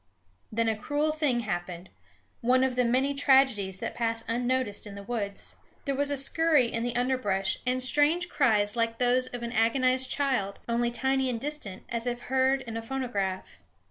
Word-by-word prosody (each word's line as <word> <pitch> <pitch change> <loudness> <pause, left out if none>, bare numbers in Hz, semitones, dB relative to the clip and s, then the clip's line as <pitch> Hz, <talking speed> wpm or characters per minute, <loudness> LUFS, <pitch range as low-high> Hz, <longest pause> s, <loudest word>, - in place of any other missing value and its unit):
Then 230 +1 0
a 220 - +1
cruel 290 +8 -1
thing 295 -6 0
happened, 175 -3 -5 0.5
one 255 +2 +3
of 260 -1 0
the 250 - +2
many 260 +4 +1
tragedies 265 -9 +3
that - - -4
pass 230 -1 -1
unnoticed 240 -2 -1
in 200 - -9
the 200 - -8
woods. 200 -2 -5 0.3
There 280 - 0
was 285 +1 0
a 285 - 0
scurry 290 -2 +3
in 230 - -1
the 240 0 -2
underbrush, 215 -7 0
and 255 0 +2
strange 295 +6 +4
cries 215 -10 +2
like 230 -1 0
those 250 +1 +2
of 245 -1 -7
an 235 - -4
agonized 255 +3 +2
child, 255 -9 -1
only 235 0 +1
tiny 265 +2 0
and 235 -2 -2
distant, 270 -9 -6
as 235 +1 -3
if 240 0 -2
heard 265 +2 +1
in 230 -2 -6
a - - -3
phonograph. 225 -7 -4
245 Hz, 180 wpm, -28 LUFS, 225-265 Hz, 0.5 s, strange